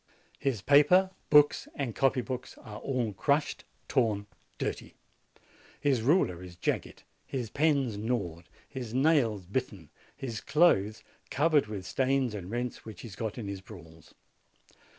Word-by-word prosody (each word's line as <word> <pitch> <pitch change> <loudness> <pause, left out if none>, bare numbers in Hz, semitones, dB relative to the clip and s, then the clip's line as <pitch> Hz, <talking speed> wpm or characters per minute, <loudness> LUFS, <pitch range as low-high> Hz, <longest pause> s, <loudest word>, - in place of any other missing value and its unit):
His 125 -8 -1
paper, 150 +7 +5 0.2
books, 150 -1 +5
and 135 -5 -2
copy 135 +1 +2
books 125 0 -6
are 105 -1 -9
all 125 -6 -1
crushed, 145 +9 0 0.2
torn, 110 -6 +1 0.3
dirty. - - -4 0.8
His 140 -5 +2
ruler 115 - +2
is 90 -1 -10
jagged, 90 - -3 0.2
his 125 -5 -4
pens 140 -7 +1
gnawed, 100 -8 -3 0.2
his 125 -3 -6
nails 130 - +3
bitten, 100 - -4 0.2
his 120 -5 -5
clothes 110 - +3 0.3
covered 150 -3 +3
with 100 -3 -6
stains 130 0 +1
and 95 -3 -6
rents 120 +2 -3
which 110 -2 -10
he 120 - -8
has 95 - -10
got 110 +1 -4
in 110 -4 -5
his 100 -1 -5
brawls. 80 -6 -14
120 Hz, 140 wpm, -30 LUFS, 100-140 Hz, 0.8 s, paper